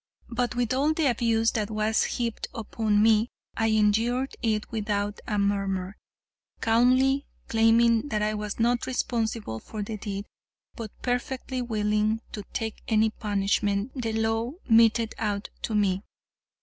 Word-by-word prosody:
But 245 0 -1
with 245 -1 0
all 285 +4 +2
the 320 - +1
abuse 225 -1 +2
that 215 -2 -2
was 215 0 +1
heaped 235 -2 -2
upon 215 -1 +1
me, 220 +1 +4 0.3
I 225 - +1
endured 225 +5 +2
it 215 -2 -1
without 205 -2 -2
a 210 - -1
murmur, 195 -1 0 0.6
calmly 255 +4 +3 0.2
claiming 230 +2 +4
that 210 -3 0
I 215 0 +1
was 210 0 -4
not 240 +1 +1
responsible 225 - -2
for 215 - -6
the 215 +1 -5
deed, 200 0 -5 0.5
but 225 -3 -6
perfectly 255 +1 -2
willing 215 -1 0
to 210 - -5
take 220 -1 -4
any 220 -1 +3
punishment 205 +1 0
the 230 -4 -3
law 225 +3 0
meted 230 -1 +4
out 205 -1 -2
to 220 - -2
me. 195 -2 +2
220 Hz, 140 wpm, -27 LUFS, 210-235 Hz, 0.6 s, me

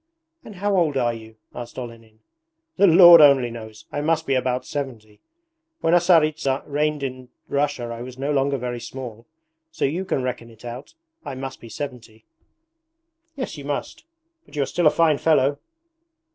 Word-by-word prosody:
'And 210 - -11
how 200 +2 0
old 160 -6 +2
are 120 -2 +1
you?' 110 -1 -11 0.2
asked 120 -1 -8
Olenin. 115 -3 -10 0.6
'The 200 - +6
Lord 175 -1 +9
only 135 -5 +5
knows! 110 -2 -10
I 145 - -3
must 160 +1 0
be 135 - 0
about 130 -1 0
seventy. 115 -7 -6 0.6
When 165 - +2
a 175 - +7
Tsaritsa 155 -6 +2
reigned 150 0 -1
in 130 -1 -6 0.2
Russia 140 -3 -1
I 115 - -8
was 125 +1 -9
no 140 +2 -2
longer 140 0 +1
very 120 -1 -4
small. 120 -2 -9 0.4
So - - -1
you 165 +7 -1
can 160 -8 -2
reckon 125 -2 -4
it 115 +1 -16
out. 125 - -8 0.3
I - - -6
must 135 0 -7
be 115 - -11
seventy.' 115 -5 -8 1.1
'Yes 255 - -5
you - - -9
must, 145 0 -4 0.4
but - - -17
you 145 - +1
are - - -1
still 175 +2 +1
a - - +8
fine 155 -2 +2
fellow.' 145 -3 +2
135 Hz, 175 wpm, -23 LUFS, 120-155 Hz, 1.1 s, Lord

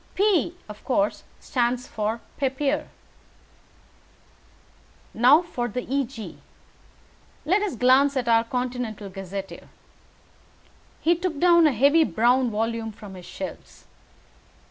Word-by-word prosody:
P, 380 -4 +2
of 210 0 -11
course, 300 +3 0 0.2
stands 245 0 -1
for 220 +2 -3 0.2
'Papier.' 275 +1 -1 2.2
Now 265 +9 +5
for 245 -8 -3
the 245 +2 -4
Eg. 265 -4 -4 1.1
Let 380 +7 +2
us 415 -10 -2
glance 265 +3 +4
at 245 -2 -1
our 230 -1 +4
'Continental 245 -4 -4
Gazetteer.'" 195 0 -7 1.3
He 340 +2 +3
took 340 -3 -3
down 340 -1 +6
a - - +3
heavy 280 +7 +4
brown 245 -1 +2
volume 225 +1 -2
from 205 -2 -12
his 180 -2 -11
shelves. - - -9
250 Hz, 110 wpm, -24 LUFS, 225-295 Hz, 2.2 s, down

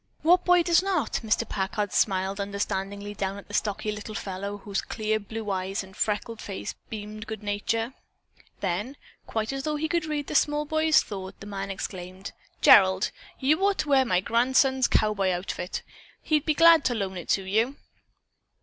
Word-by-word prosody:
"What 355 +3 +5
boy 355 -1 +5
does 340 0 +4
not?" 370 - 0
Mr. 215 -1 +1
Packard 205 +1 -2
smiled 195 0 +1
understandingly 200 0 -3
down 195 -1 -3
at 200 - -11
the 205 - -12
stocky 210 0 -1
little 215 +1 -7
fellow 200 +1 -4
whose 200 -1 -3
clear 215 -1 -1
blue 215 0 -5
eyes 190 +1 -2
and 190 0 -14
freckled 220 +2 -2
face 195 -2 -5 0.2
beamed 215 0 -7
good 220 -1 -6
nature. 225 +4 -1 0.7
Then, 205 +9 -2 0.3
quite 220 +3 -2
as 270 - -3
though 300 +2 -2
he 305 +2 -1
could 340 -1 0
read 300 -2 -2
the - - -6
small 295 0 +2
boy's 315 +1 +3
thought, 190 -2 -7
the - - -10
man 195 -1 -5
exclaimed: 185 0 -6 0.3
"Gerald, 190 0 +6 0.3
you 305 +7 +2
ought 400 0 +3
to 295 - -2
wear 270 -2 +5
my 185 -8 +1
grandson's 260 +4 +3
cowboy 210 -3 +2
outfit. 180 0 -3 0.4
He'd 310 0 +1
be 310 - +3
glad 330 -1 +7
to 245 - +2
loan 195 -3 -3
it 175 - -7
to 195 - +2
you." 220 +8 +1
215 Hz, 175 wpm, -26 LUFS, 195-270 Hz, 0.7 s, glad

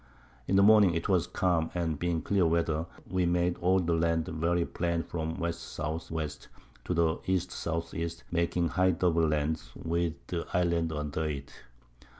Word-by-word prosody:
In 95 - +2
the 100 - +6
Morning 100 -5 +6
'twas 90 0 +1
calm, 85 -3 +1
and 80 -4 -1
being 85 -2 -1
clear 95 -4 +2
Weather, 80 -1 0 0.2
we 90 -1 +1
made 85 0 +1
all 95 +2 +3
the 85 -2 0
Land 80 -1 +1
very 85 +2 0
plain 85 -1 -1
from 80 -1 -3
W. 85 - -1
S. 85 0 -7
W. 80 +1 -3 0.6
to - - -1
the 85 -1 +2
E. 95 - +3
S. 85 -2 -3
E. 85 0 -2 0.2
making 85 0 +1
high 95 0 +3
double 85 -2 +2
Land, 75 +1 0
with 85 0 -1 0.4
Islands 85 -2 +1
under 75 +1 -2
it. 70 -3 -4
85 Hz, 160 wpm, -30 LUFS, 80-90 Hz, 0.6 s, the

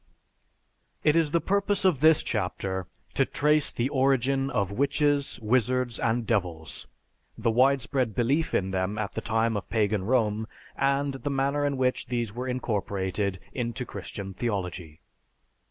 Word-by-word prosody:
It 150 - +4
is 165 -2 +3
the 170 - +2
purpose 200 +1 0
of 175 -8 +4
this 155 +1 +5
chapter 95 -3 -2 0.3
to - - +3
trace 150 0 +2
the 120 - -1
origin 135 0 +2
of 100 -7 0
witches, 140 +4 +1
wizards, 125 +1 +1
and 115 0 0
devils, 90 -8 -2 0.5
the 115 0 +1
widespread 130 -1 +2
belief 135 +7 +1
in 95 0 0
them 95 +2 -1
at 100 -3 -2
the - - -4
time 115 0 +1
of 100 - -4
pagan 105 -3 +1
Rome, 110 -2 +1 0.3
and 140 +1 +1
the 135 +2 -4
manner 140 +1 0
in 140 -1 -1
which 130 0 0
these 120 -4 -2
were 125 +2 -4
incorporated 100 -6 -2
into 120 -1 -3
Christian 100 -4 -7
theology. 90 -7 -4
120 Hz, 145 wpm, -27 LUFS, 105-140 Hz, 0.5 s, this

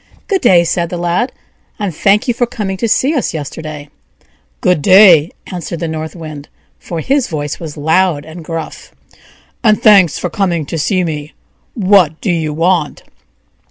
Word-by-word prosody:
"Good 390 -2 0
day!" 180 -9 +5
said 170 0 -1
the 175 - -4
Lad, 175 +9 -1 0.5
"and 200 -7 -3
thank 205 - +2
you 245 - +2
for 245 +1 0
coming 210 -5 -4
to 230 - -1
see 265 +7 +2
us 265 - -1
yesterday." 150 0 -7 0.7
"GOOD 180 -5 +1
DAY!" 185 -4 +6 0.2
answered 175 -2 -6
the 165 - -3
North 160 +1 -5
Wind, 155 -4 -9 0.3
for 170 -2 -5
his 275 - 0
voice 150 -3 -4
was 155 -3 -8
loud 160 0 +1
and 160 +2 -10
gruff, 165 0 -7 0.7
"AND 215 0 +3
THANKS 195 -8 +5
FOR 180 - -4
COMING 175 -6 -1
TO 165 - -4
SEE 185 +5 0
ME. 150 -3 -5 0.4
WHAT 185 - +3
DO 195 - -1
YOU 160 -3 -1
WANT?" 165 0 0
170 Hz, 165 wpm, -14 LUFS, 155-200 Hz, 0.7 s, DAY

